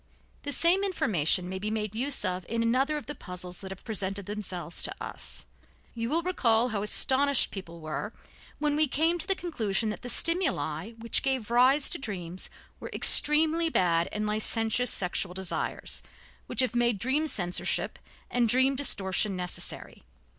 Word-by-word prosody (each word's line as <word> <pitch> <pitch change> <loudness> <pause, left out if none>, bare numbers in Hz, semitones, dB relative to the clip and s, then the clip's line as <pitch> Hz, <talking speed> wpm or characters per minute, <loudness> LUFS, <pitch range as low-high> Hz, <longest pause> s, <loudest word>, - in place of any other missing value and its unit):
The 285 - -4
same 340 +7 +3
information 180 - +2
may 190 +1 -4
be 210 +2 -2
made 215 -1 -3
use 265 +5 0
of 180 0 -2
in 230 +1 0
another 265 +6 +1
of 295 - -7
the 295 - -5
puzzles 180 -7 -8
that 190 - -8
have 190 -1 -9
presented 200 -3 -4
themselves 185 -4 -3
to - - -1
us. - - -4 0.5
You 230 0 -3
will 330 +4 +1
recall 245 -10 +2
how 210 -3 -2
astonished 270 +6 +3
people 170 -4 -8
were 155 +7 -5 0.5
when 295 -1 0
we 305 0 +3
came 325 +6 +1
to 335 - -3
the 390 - +4
conclusion 225 - -1
that - - -7
the 245 - -7
stimuli 225 - 0
which 230 0 +1
gave 260 -5 -1
rise 260 +4 +4
to - - -3
dreams 185 -7 -5 0.3
were - - -7
extremely 320 +2 +4
bad 170 - +2
and 210 0 -2
licentious 225 +3 +2
sexual 180 -1 -2
desires 190 -2 -2 0.5
which - - -1
have 255 -1 -1
made 240 -2 +2
dream 270 +9 0
censorship 180 - 0 0.3
and 240 -2 +2
dream 260 +3 +4
distortion 200 -7 +3
necessary. 180 0 -3
225 Hz, 165 wpm, -28 LUFS, 190-280 Hz, 0.5 s, the